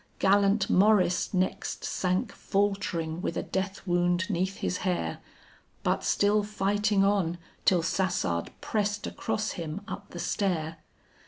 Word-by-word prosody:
Gallant 200 +1 +3
Maurice 190 -2 +3
next 185 -1 -1
sank 190 +4 0
faltering 195 -6 -1
with 170 - -2
a - - -1
death 190 +1 -3
wound 175 +1 +2
'neath 190 +2 -1
his 180 - -1
hair, 180 -2 -1 0.6
But - - +1
still 205 +1 +3
fighting 205 0 +1
on 195 -4 +2 0.3
till 175 -3 +4
Sassard 165 - 0
pressed 205 -1 -1
across 220 0 -2
him 165 +2 -5
up 200 -2 -7
the - - -9
stair. 170 -3 -1
195 Hz, 130 wpm, -28 LUFS, 175-205 Hz, 0.6 s, till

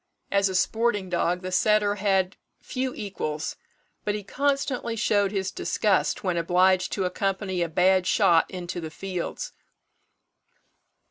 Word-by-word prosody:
As 200 0 +3
a 190 - -4
sporting 205 0 +1
dog 180 +1 0
the 185 - -4
setter 210 +2 +3
had 195 -2 +1 0.2
few 260 0 -3
equals, 155 -7 -4 0.5
but 205 - -1
he 210 - -5
constantly 275 0 -1
showed 205 -3 +2
his 195 -2 -2
disgust 215 +3 0
when 180 -3 0
obliged 180 +2 +3
to 195 - -1
accompany 190 0 -1
a 170 - 0
bad 185 +2 +3
shot 175 -6 +4
into 180 -1 -5
the 160 - -5
fields. 190 - -5
190 Hz, 135 wpm, -26 LUFS, 180-210 Hz, 0.5 s, shot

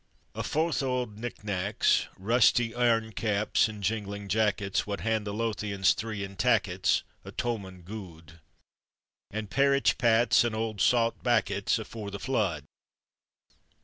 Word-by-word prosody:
A - - -4
fouth 160 +1 0
o' 135 - -1
auld 125 -5 -3
knick 120 -2 -6
knackets, 100 0 +1
Rusty 115 +2 +3
airn 115 -2 +1
caps 105 0 +1
and 105 -2 -8
jinglin' 100 -1 -3
jackets, 105 -1 0
Wad 100 -1 -3
hand 110 -1 -1
the - - -2
Lothians 105 -3 +1
three, 110 -2 -4
in 100 0 -8
tackets, 100 -5 +2 0.2
A - - -9
towmond 95 -7 -4
guid; 85 -5 -10 0.9
An' 110 +1 -4
parritch 140 +6 +2
pats, 120 -1 +4
and 120 -2 -1
auld 110 -2 -3
saut 115 -2 +2
backets, 110 -4 +1
Afore 110 -1 -7
the 100 - -6
flood. 100 - -1
110 Hz, 140 wpm, -28 LUFS, 100-115 Hz, 0.9 s, pats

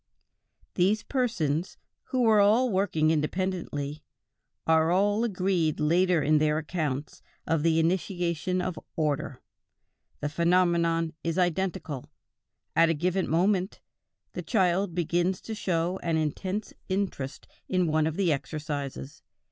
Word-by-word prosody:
These 200 +4 +2
persons, 185 - -1 0.3
who 255 -2 0
were 220 -2 +5
all 220 +5 +4
working 175 -5 +2
independently, 155 -2 -2 0.6
are 160 0 +4
all 205 +4 +2
agreed 185 -7 0
later 170 +1 +3
in 155 +1 +4
their 150 0 +2
accounts 155 -3 -3 0.2
of 165 -2 +1
the 165 0 +2
initiation 175 0 0
of 180 -2 -3 0.2
order: 145 -4 -2 0.8
the 145 - -2
phenomenon 170 0 +2
is 165 +1 -2
identical; 175 -6 -1 0.7
at 165 0 +5
a 165 - +2
given 180 +4 0
moment, 185 +3 +1 0.5
a - - -4
child 185 -3 +1
begins 175 +2 0
to 225 - -6
show 180 -3 -1
an 165 -2 0
intense 185 +7 -2 0.2
interest 185 -8 -3 0.2
in 185 -1 +2
one 155 -1 +2
of 160 - -3
the 180 -5 +3
exercises. 145 -1 -5
170 Hz, 125 wpm, -27 LUFS, 155-190 Hz, 0.8 s, were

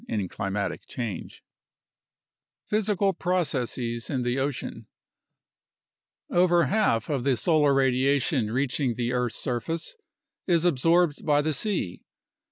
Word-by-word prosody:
26 - - -5
UNDERSTANDING 95 -3 -2
CLIMATIC 100 0 -3
CHANGE 115 -6 -6 1.2
Physical 205 -2 +1
Processes 130 -10 -2
in 130 -3 -1
the 120 +2 0
Ocean 140 -1 -4 1.4
Over 175 -1 +4
half 200 - +1
of 140 -5 -1
the 135 -2 +2
solar 150 0 +3
radiation 135 -1 +2
reaching 130 +1 0
the 120 +1 -1
earth's 125 -2 -1
surface 135 +7 -3 0.5
is 170 -2 +3
absorbed 165 +1 +2
by 145 -1 +3
the 155 +1 0
sea. 180 - -2
140 Hz, 115 wpm, -26 LUFS, 120-170 Hz, 1.4 s, Over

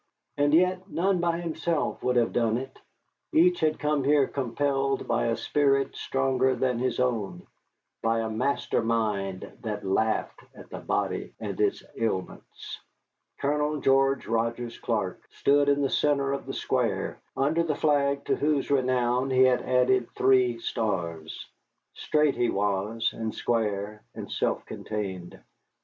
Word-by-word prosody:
And 145 0 +2
yet 185 +4 +2
none 185 +2 +1
by 170 0 0
himself 165 -1 -2
would 125 - 0
have 120 -1 +2
done 115 -1 +2
it 130 +1 -7 0.5
each 180 +2 +4
had 155 -1 +1
come 150 -2 0
here 145 0 +4
compelled 135 +1 -1
by - - +1
a 115 - 0
spirit 140 -2 +1
stronger 130 -1 +1
than 125 -2 0
his 130 +1 -1
own, 120 -6 -1 0.6
by 115 0 +1
a 110 - -2
master 130 +6 0
mind 105 -5 -2
that 105 -3 -4
laughed 110 +3 0 0.2
at - - -13
the - - -6
body - - -2
and - - -4
its - - +1
ailments. 110 -5 -4 0.6
Colonel 150 +1 0
George 135 0 +3
Rogers 115 +1 -2
Clark - - -2
stood 145 0 +2
in 140 0 +2
the 135 - +1
centre 140 -2 +2
of 140 - -5
the - - -4
square, - - -1 0.2
under 150 +5 +2
the 160 -3 0
flag 140 -2 +1
to - - +1
whose 145 -2 0
renown 125 -1 +1
he 130 0 +4
had 130 -1 +4
added 125 -1 +2
three 125 -2 +4
stars. 85 -9 -3 0.5
Straight 150 -2 +1
he 120 -1 +1
was, 105 +3 0
and 110 -1 -4
square, 105 -2 -1
and - - -7
self - - -1
contained. 95 -5 -5
130 Hz, 145 wpm, -27 LUFS, 115-145 Hz, 0.6 s, each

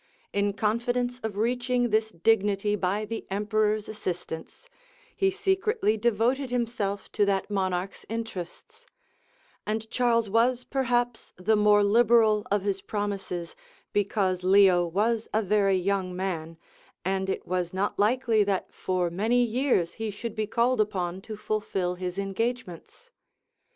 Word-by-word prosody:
In 200 0 +1
confidence 245 +4 -1
of 220 -4 -4
reaching 245 +1 0
this 220 +1 +2
dignity 205 +1 +1
by 200 +2 -1
the 225 +1 -6
emperor's 210 +1 0
assistance, 180 - -6 0.5
he 390 - +2
secretly 390 - +1
devoted 235 +4 +1
himself 225 -5 -2
to 210 - +1
that 195 +1 0
monarch's 185 -1 -2
interests; 225 - -7 0.8
and 220 +1 -3
Charles 235 -3 +2
was 235 +4 +2
perhaps 245 -3 -1
the 190 +5 +2
more 210 0 +5
liberal 220 0 +4
of 205 -1 +1
his 195 -1 -1
promises, 195 -4 -4 0.4
because 195 -3 +1
Leo 185 -2 +5
was 215 +6 0
a 220 - +2
very 200 -1 +3
young 185 -1 -1
man; 165 -3 -4 0.5
and 190 0 -1
it - - -3
was 180 -1 -1
not 195 +2 -2
likely 225 0 +3
that 195 -2 -2
for 180 -2 -1
many 225 +7 +2
years 240 -7 +1
he 220 - -1
should 210 +2 -5
be 215 -1 -2
called 235 +2 +2
upon 185 -3 -2
to 215 +1 -8
fulfil 205 -4 -2
his 180 0 -5
engagements. 225 - -4
210 Hz, 135 wpm, -27 LUFS, 190-235 Hz, 0.8 s, more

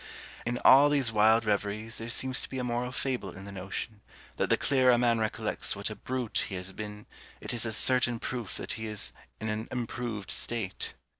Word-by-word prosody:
In 120 0 0
all 140 +3 +9
these 140 -6 +2
wild 110 +1 +4
reveries 105 +1 -1
there 115 +1 -5
seems 130 +2 +1
to - - -2
be 130 - -5
a 125 - -1
moral 125 +1 -1
fable 125 -8 -2
in 95 - -9
the 100 - -8
notion, 100 +3 -5 0.4
that - - 0
the - - +4
clearer 130 -2 +3
a 120 - +5
man 120 -1 +3
recollects 110 -1 -1
what 100 +2 -4
a - - -5
brute 125 +2 -1
he 95 - -4
has 90 +1 -4
been, 105 0 -7 0.3
it - - -4
is 120 -1 0
a - - -2
certain 120 +1 +4
proof 120 -3 -4
that - - -4
he 110 -1 -4
is 105 -2 -4 0.3
in 110 - -4
an 110 +1 -2
improved 120 -4 -4
state! 115 -5 -2
115 Hz, 210 wpm, -29 LUFS, 105-125 Hz, 0.4 s, all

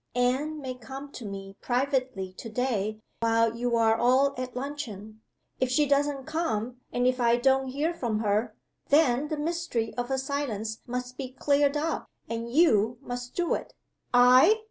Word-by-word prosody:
Anne 265 +5 +1
may 260 -3 -4
come 265 +3 -9
to 240 - -8
me 195 0 -7
privately 255 -7 -1
to 225 - -8
day 215 -3 -1 0.2
while 230 0 +2
you 240 0 0
are 225 -1 +4
all 260 +4 +3
at 255 -1 -5
luncheon. 225 -6 -6 0.4
If 255 - +1
she 295 +4 +3
doesn't 280 -1 +1
come 250 -7 -2
and 245 0 0
if 255 0 +2
I 235 0 +4
don't 265 +2 +2
hear 290 +6 -1
from 235 -9 -2
her, 210 +2 0 0.3
then 285 -2 +3
the 310 - -3
mystery 310 -7 -2
of 245 +1 -2
her 265 - 0
silence 260 -6 -3
must 250 +1 -4
be 265 -2 -4
cleared 285 +2 +2
up; 320 +2 -2 0.2
and 230 0 -4
You 240 -7 +4
must 245 0 -6
do 350 -1 +1
it!" - - -5 0.4
"I!" 255 - +6
250 Hz, 165 wpm, -28 LUFS, 230-280 Hz, 0.4 s, I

